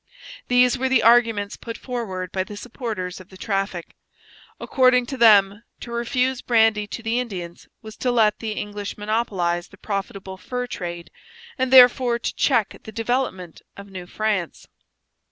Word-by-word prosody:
These 250 +1 +3
were 265 0 0
the 260 -3 +3
arguments 230 -3 +3
put 230 -1 -7
forward 190 -8 -5
by 190 - -1
the 205 +2 -10
supporters 210 -6 -5
of 185 0 -14
the 190 - -14
traffic. 195 -4 -3 0.7
According 255 -1 +3
to 270 - -6
them, 205 -3 +5 0.2
to 235 - -9
refuse 250 +2 -1
brandy 220 -3 +2
to 230 - -7
the 230 +2 0
Indians 180 -8 -6 0.2
was 220 0 -10
to 250 - 0
let 220 -3 +2
the 220 -2 -4
English 205 -1 -6
monopolize 195 -5 -1
the 195 - -18
profitable 195 -1 -5
fur 250 +6 -4
trade, 175 -7 -7 0.4
and 260 -2 -1
therefore 250 -1 +6
to 235 - -4
check 230 -7 +1
the 220 - -10
development 225 -6 -3 0.2
of 200 0 -11
New 180 -2 -8
France. 205 -4 -3
220 Hz, 155 wpm, -22 LUFS, 195-245 Hz, 0.7 s, therefore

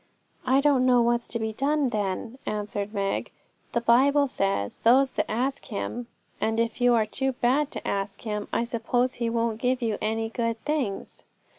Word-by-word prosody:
'I 265 +2 +4
don't 275 -3 +3
know 250 -1 +5
what's 235 0 +1
to - - -3
be 220 -1 -2
done, 280 +3 +1
then,' 215 +3 -3
answered 210 -1 -3
Meg. 200 -2 -1 0.4
'The 235 - 0
Bible 275 +5 +4
says, 195 - -1
"Those 260 +3 +5
that - - -2
ask 255 +5 -1
Him"; 235 +2 -4 0.3
and 225 +1 +1
if 230 +1 -1
you 245 -1 +5
are 220 -2 +3
too 265 +5 -1
bad 265 +4 +1
to - - -6
ask 195 0 -2
Him, 210 -2 -3
I - - +1
suppose 245 +2 0
He 235 - +1
won't 230 -1 -1
give 255 0 +1
you 225 -4 -1
any 225 +1 -1
good 230 -1 -2
things.' 280 -10 -2
235 Hz, 180 wpm, -26 LUFS, 215-255 Hz, 0.4 s, know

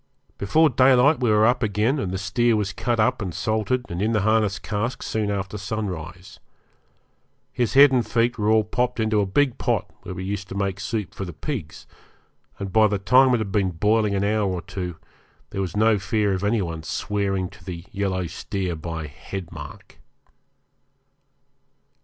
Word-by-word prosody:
Before 155 +11 +4
daylight 130 +4 +5
we 125 -3 +1
were 105 0 +4
up 125 +2 +3
again, 110 +6 +1
and 95 -8 -2
the 95 - -2
steer 115 +4 +1
was 100 -3 -1
cut 115 +4 -1
up 110 +1 +2
and 90 -5 -4
salted 110 +5 -1
and 85 +2 -4
in 110 +2 +1
the 105 - +2
harness 110 -1 +2
cask 115 +5 -3
soon 110 -2 -1
after 100 +1 -3
sunrise. 95 -3 -5 1.1
His 120 -1 -1
head 140 0 +8
and 125 -2 +2
feet 115 0 0
were 105 0 +1
all 110 0 +4
popped 120 +3 -1
into 110 -1 +2
a 100 - 0
big 130 +6 +1
pot - - 0 0.2
where 90 - -7
we 95 - -5
used 100 0 -4
to - - -6
make 100 -1 -2
soup 105 +1 -3
for - - -5
the 90 -2 -6
pigs, 100 - -6 0.7
and 95 -2 -6
by 110 -1 +6
the 105 -1 0
time 125 +7 +5
it - - +2
had 110 -3 -3
been 100 -2 +1
boiling 105 +4 +1
an 100 - 0
hour 105 -1 +1
or 90 -2 -3
two 90 -3 -5 0.6
there 95 - -2
was 95 +1 -3
no 110 -1 +4
fear 105 0 0
of 95 +1 -3
any 105 0 +1
one 80 -2 -5
swearing 95 +2 -2
to - - -17
the 85 -1 -7
yellow 95 -2 -1
steer 90 +2 -4
by 80 0 -5
'head 90 +4 -8
mark'. 75 -4 -11
105 Hz, 190 wpm, -23 LUFS, 95-110 Hz, 1.1 s, head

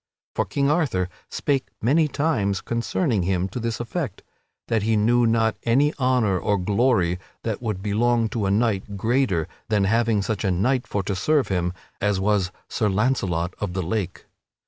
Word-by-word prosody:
For - - 0
King 140 0 +1
Arthur 130 - +1 0.2
spake 135 -2 -1
many 150 +7 +3
times 115 -11 0
concerning 115 - 0
him 90 +1 0
to 115 - -5
this 115 -1 -2
effect: 120 -1 -4 0.4
that 115 -2 +1
he 110 +2 +1
knew 120 +3 +3
not 115 -1 +2
any 140 +6 +3
honor 125 -8 +2
or 105 +2 +1
glory 100 -2 +2 0.2
that 110 -3 -2
could 105 -5 -3
belong 115 +3 +2
to 105 -3 -1
a - - +1
king 105 -1 +2 0.2
greater 110 - +1 0.2
than 105 -2 +2
having 115 0 +2
such 110 +1 -2
a 100 - +1
knight 120 +8 +1
for 100 - -1
to 100 +1 -2
serve 145 +9 +1
him 90 -2 0 0.3
as 105 -1 +1
was 95 -2 +1 0.2
Sir 110 -3 0
Launcelot 95 -5 0
of 100 -4 -3
the 95 0 -1
Lake. 90 0 -3
110 Hz, 170 wpm, -24 LUFS, 95-120 Hz, 0.4 s, many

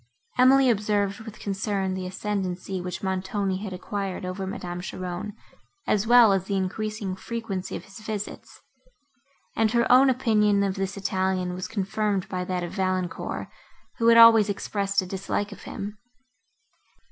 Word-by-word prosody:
Emily 265 +1 +6
observed 205 -3 +1
with 220 -1 -10
concern 195 -1 -2
the 185 -1 -4
ascendancy, 190 -1 -3
which 180 +1 -6
Montoni 190 0 -1
had 200 0 -6
acquired 190 0 -4
over 185 +1 -4
Madame 175 -2 -5
Cheron, 185 +2 -5 0.5
as 210 +1 +1
well 240 -3 +7
as 190 -1 0
the 200 - -2
increasing 200 +1 -2
frequency 200 -3 -5
of - - -6
his 195 +2 -12
visits; 210 -1 -6 0.9
and 225 -1 +3
her 235 -1 +3
own 260 +2 +7
opinion 210 -5 +3
of 195 -1 0
this 195 0 -3
Italian 190 -1 -1
was 180 0 -4
confirmed 200 -1 -1
by 180 -1 -2
that 180 -1 -2
of 175 - -5
Valancourt, 185 -2 -2 0.5
who 230 - +2
had 230 0 +7
always 225 -2 +8
expressed 200 0 -1
a - - -7
dislike 195 +2 -3
of 200 - -11
him. 205 +1 -6
195 Hz, 150 wpm, -26 LUFS, 185-215 Hz, 0.9 s, always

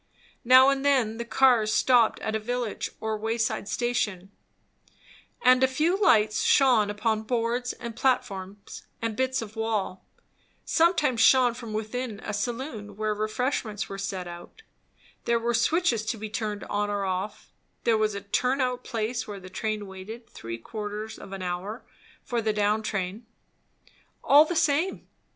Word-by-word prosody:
Now 255 +2 +7
and 275 0 0
then 255 -6 +2
the 235 - -4
cars 235 -4 +4
stopped 240 0 +4
at 220 - -2
a - - 0
village 240 0 -3
or 220 0 -2
wayside 225 -1 -1
station; 210 -6 -1 1.1
and 255 +1 +6
a - - +6
few 305 +7 +1
lights 215 - +4
shone 245 -7 +4
upon 215 +1 0
boards 240 +2 -1
and 235 -1 -8
platforms 200 -6 -2
and 225 -1 -2
bits 260 0 0
of 215 0 -11
wall; 220 -4 -2 0.6
sometimes 320 -8 +2
shone 250 0 +6
from 235 -2 -8
within 220 +1 -4
a 210 - -5
saloon 220 -1 -4
where 215 0 0
refreshments 215 0 -2
were 195 - -6
set 190 -2 -4
out; 175 - -11 0.6
there 235 - +2
were 235 +1 -1
switches 235 0 +2
to 225 - -1
be 215 0 -7
turned 215 -2 -3
on 205 0 -1
or 205 -1 -1
off; 190 +2 -4 0.3
there 230 -2 +3
was 215 -1 +1
a 200 - -4
turn 250 +7 0
out 250 -1 -1
place 235 0 -3
where 205 -2 -6
the 185 0 -12
train 215 0 -3
waited 200 +5 -9
three 115 0 -7
quarters 210 - -6
of - - -11
an 195 -1 -5
hour 180 +6 -4 0.4
for 240 -1 -2
the 220 -1 +1
down 210 +1 +1
train. 205 +1 -4 1.0
All 290 +2 +7
the 345 - -3
same! 315 +4 +1
220 Hz, 160 wpm, -26 LUFS, 210-250 Hz, 1.1 s, Now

